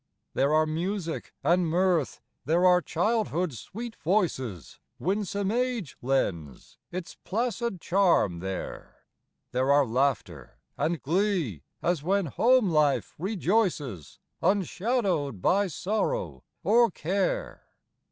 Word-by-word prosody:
There 140 Hz, +2 st, +2 dB
are 155 Hz, +1 st, +4 dB
music 170 Hz, +2 st, -3 dB
and 175 Hz, 0 st, +3 dB
mirth; 175 Hz, -3 st, +1 dB, 0.2 s
there 170 Hz, +4 st, +2 dB
are 180 Hz, -1 st, +6 dB
childhood's 180 Hz, -, 0 dB
sweet 225 Hz, -, -7 dB
voices, 145 Hz, -, -1 dB, 0.2 s
Winsome 200 Hz, +1 st, -1 dB
age 245 Hz, -, -1 dB
lends 90 Hz, -, -2 dB
its 180 Hz, -1 st, -6 dB
placid 235 Hz, -1 st, -2 dB
charm 170 Hz, -, +2 dB
there; 95 Hz, +1 st, -6 dB, 0.5 s
There 130 Hz, +2 st, +1 dB
are 145 Hz, 0 st, +5 dB
laughter 115 Hz, -, -1 dB, 0.2 s
and 165 Hz, 0 st, 0 dB
glee 170 Hz, -, 0 dB, 0.2 s
as 175 Hz, -3 st, +1 dB
when 195 Hz, +4 st, +1 dB
home 230 Hz, -, +3 dB
life 150 Hz, -3 st, +2 dB
rejoices 180 Hz, -, -1 dB, 0.2 s
Unshadowed 190 Hz, -, 0 dB
by 200 Hz, -, +2 dB
sorrow 215 Hz, -, -2 dB, 0.2 s
or 235 Hz, +2 st, +5 dB
care. 200 Hz, -, -2 dB
180 Hz, 105 wpm, -27 LUFS, 140-205 Hz, 0.5 s, are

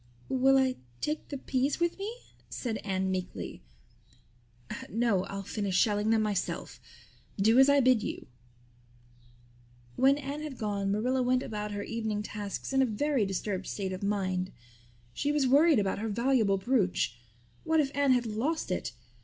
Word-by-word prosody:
"Will 265 Hz, +1 st, +4 dB
I 260 Hz, -1 st, +2 dB, 0.2 s
take 305 Hz, +1 st, -3 dB
the 280 Hz, -, -5 dB
peas 270 Hz, +3 st, -1 dB
with 345 Hz, +2 st, 0 dB
me?" 405 Hz, +3 st, -3 dB, 0.4 s
said 230 Hz, -4 st, -3 dB
Anne 190 Hz, -1 st, -1 dB
meekly. 185 Hz, -1 st, -4 dB, 1.3 s
"No, 210 Hz, -3 st, +1 dB
I'll 195 Hz, 0 st, -5 dB
finish 200 Hz, -1 st, -2 dB
shelling 210 Hz, +1 st, +2 dB
them 220 Hz, -1 st, +3 dB
myself. 205 Hz, -3 st, -2 dB, 0.6 s
Do 220 Hz, +5 st, +5 dB
as 270 Hz, +1 st, +7 dB
I 280 Hz, 0 st, +5 dB
bid 255 Hz, -3 st, +4 dB
you." -, -, -5 dB, 1.7 s
When 270 Hz, +2 st, +5 dB
Anne 290 Hz, +1 st, -5 dB
had 300 Hz, -4 st, -6 dB
gone 200 Hz, -2 st, -1 dB
Marilla 250 Hz, +6 st, +1 dB
went 255 Hz, +1 st, +2 dB
about 210 Hz, -1 st, -4 dB
her 205 Hz, 0 st, -3 dB
evening 220 Hz, -2 st, -2 dB
tasks 210 Hz, +4 st, -5 dB
in 270 Hz, -, +4 dB
a -, -, +5 dB
very 245 Hz, 0 st, 0 dB
disturbed 195 Hz, 0 st, -3 dB
state 190 Hz, -2 st, -3 dB
of 185 Hz, -, -6 dB
mind. 190 Hz, -2 st, -1 dB, 0.6 s
She 285 Hz, -, 0 dB
was 295 Hz, -2 st, +2 dB
worried 290 Hz, +4 st, +5 dB
about 200 Hz, -2 st, 0 dB
her 220 Hz, +1 st, -2 dB
valuable 230 Hz, -2 st, +2 dB
brooch. 190 Hz, -, 0 dB, 0.4 s
What 320 Hz, 0 st, +2 dB
if 280 Hz, -2 st, 0 dB
Anne 280 Hz, -2 st, +4 dB
had 245 Hz, -1 st, +1 dB
lost 230 Hz, -, -2 dB
it? 180 Hz, -, -2 dB
225 Hz, 160 wpm, -30 LUFS, 200-270 Hz, 1.7 s, as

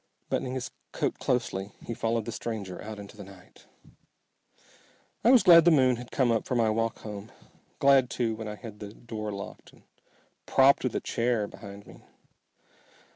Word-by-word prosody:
Buttoning 130 Hz, 0 st, -1 dB
his 130 Hz, -, -4 dB, 0.2 s
coat -, -, -2 dB
closely, 100 Hz, -5 st, -1 dB
he 115 Hz, -, -4 dB
followed 115 Hz, -1 st, -1 dB
the 115 Hz, -, -4 dB
stranger 105 Hz, -5 st, -5 dB
out 110 Hz, 0 st, -7 dB
into 100 Hz, +1 st, -10 dB
the 105 Hz, -, -9 dB
night. 95 Hz, -2 st, -16 dB, 1.6 s
I 230 Hz, -, +5 dB
was 255 Hz, -4 st, +7 dB
glad 170 Hz, -3 st, +9 dB
the 175 Hz, -, +6 dB
moon 130 Hz, -6 st, +4 dB
had 125 Hz, 0 st, -9 dB
come 130 Hz, -4 st, +2 dB
up 115 Hz, -, 0 dB
for 125 Hz, -, -1 dB
my 115 Hz, -2 st, +3 dB
walk 115 Hz, +1 st, -1 dB
home, 105 Hz, 0 st, -8 dB, 0.5 s
glad 135 Hz, -2 st, +5 dB
too 115 Hz, -2 st, -1 dB
when 110 Hz, 0 st, -6 dB
I 105 Hz, -, -5 dB
had 105 Hz, -1 st, -10 dB
the 105 Hz, +1 st, -9 dB
door 110 Hz, -2 st, -6 dB
locked 100 Hz, 0 st, -9 dB
and -, -, -21 dB, 0.6 s
propped 135 Hz, +1 st, +5 dB
with 130 Hz, -, -1 dB
a -, -, 0 dB
chair 115 Hz, -2 st, 0 dB
behind 100 Hz, 0 st, -11 dB
me. -, -, -15 dB
115 Hz, 180 wpm, -28 LUFS, 105-125 Hz, 1.6 s, glad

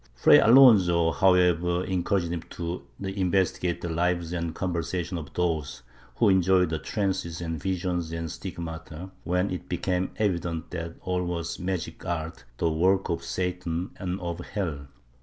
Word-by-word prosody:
Fray -, -, +7 dB
Alonso 95 Hz, -10 st, +6 dB
however 90 Hz, -1 st, +3 dB
encouraged 90 Hz, -1 st, 0 dB
him 85 Hz, -, -3 dB
to 85 Hz, +1 st, -4 dB, 0.2 s
investigate 95 Hz, -2 st, 0 dB
the 85 Hz, -, -3 dB
lives 85 Hz, 0 st, 0 dB
and^ 85 Hz, -2 st, -3 dB
conversation 90 Hz, 0 st, -2 dB
of 75 Hz, -5 st, -6 dB
those 80 Hz, -7 st, -1 dB, 0.3 s
who 115 Hz, -, +3 dB
enjoyed 95 Hz, -2 st, +4 dB
trances 95 Hz, -5 st, -2 dB
and 80 Hz, -2 st, -4 dB
visions 90 Hz, -3 st, -2 dB
and 85 Hz, 0 st, -3 dB
the 80 Hz, -, -5 dB
stigmata, 80 Hz, +1 st, -7 dB
when 90 Hz, +2 st, 0 dB
it 90 Hz, -, -5 dB
became 90 Hz, +1 st, -1 dB
evident 85 Hz, -5 st, -1 dB
that 85 Hz, -1 st, -5 dB
all 90 Hz, 0 st, -1 dB
was 85 Hz, -1 st, -3 dB
magic 90 Hz, -2 st, -4 dB
art, 85 Hz, -5 st, -4 dB
the 85 Hz, -, +1 dB
work 95 Hz, +5 st, +2 dB
of 85 Hz, -, -2 dB
Satan 90 Hz, -1 st, -3 dB
and 95 Hz, 0 st, -3 dB
of 85 Hz, -1 st, -4 dB
hell. 80 Hz, -6 st, -4 dB
90 Hz, 145 wpm, -27 LUFS, 85-95 Hz, 0.3 s, Fray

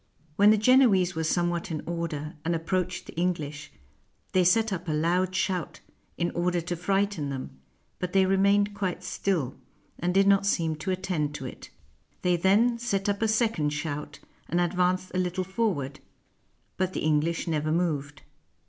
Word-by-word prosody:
When 205 Hz, +4 st, +6 dB
the 215 Hz, -, +6 dB
Genoese 210 Hz, -6 st, +4 dB
were 160 Hz, 0 st, -2 dB
somewhat 175 Hz, +2 st, 0 dB
in 155 Hz, -3 st, -4 dB
order, 165 Hz, -3 st, -4 dB
and 170 Hz, +1 st, 0 dB
approached 180 Hz, +2 st, -2 dB
the -, -, -10 dB
English, 150 Hz, -4 st, -2 dB, 0.6 s
they 185 Hz, -, +3 dB
set 215 Hz, +4 st, +3 dB
up 180 Hz, -1 st, -5 dB
a -, -, 0 dB
loud 175 Hz, +4 st, +1 dB
shout, 185 Hz, -3 st, -1 dB, 0.4 s
in 170 Hz, 0 st, 0 dB
order 175 Hz, +1 st, 0 dB
to 175 Hz, +1 st, -3 dB
frighten 195 Hz, -3 st, 0 dB
them; 135 Hz, -1 st, -5 dB, 0.5 s
but 180 Hz, -1 st, -3 dB
they 190 Hz, 0 st, +4 dB
remained 200 Hz, +2 st, +3 dB
quite 185 Hz, -3 st, -3 dB
still, 170 Hz, -10 st, -1 dB, 0.5 s
and 175 Hz, +2 st, 0 dB
did 195 Hz, +2 st, +4 dB
not 200 Hz, 0 st, +4 dB
seem 165 Hz, -5 st, +1 dB
to 155 Hz, +5 st, -5 dB
attend 180 Hz, -6 st, -1 dB
to 135 Hz, -, -6 dB
it. 125 Hz, -, -9 dB, 0.5 s
They 180 Hz, -1 st, +3 dB
then 215 Hz, +7 st, +3 dB
set 200 Hz, -4 st, -1 dB
up 200 Hz, +1 st, -1 dB
a 225 Hz, -, +3 dB
second 220 Hz, -10 st, +1 dB
shout, 145 Hz, -1 st, -4 dB, 0.3 s
and 175 Hz, -, +1 dB
ad 175 Hz, -1 st, +1 dB
vanced 185 Hz, 0 st, +1 dB
a 185 Hz, -, 0 dB
little 180 Hz, +1 st, -1 dB
forward; 185 Hz, -, -2 dB, 0.8 s
but 185 Hz, 0 st, -1 dB
the -, -, -3 dB
English 155 Hz, +3 st, +1 dB
never 155 Hz, -1 st, 0 dB
moved. 150 Hz, -4 st, -1 dB
180 Hz, 170 wpm, -27 LUFS, 160-195 Hz, 0.8 s, When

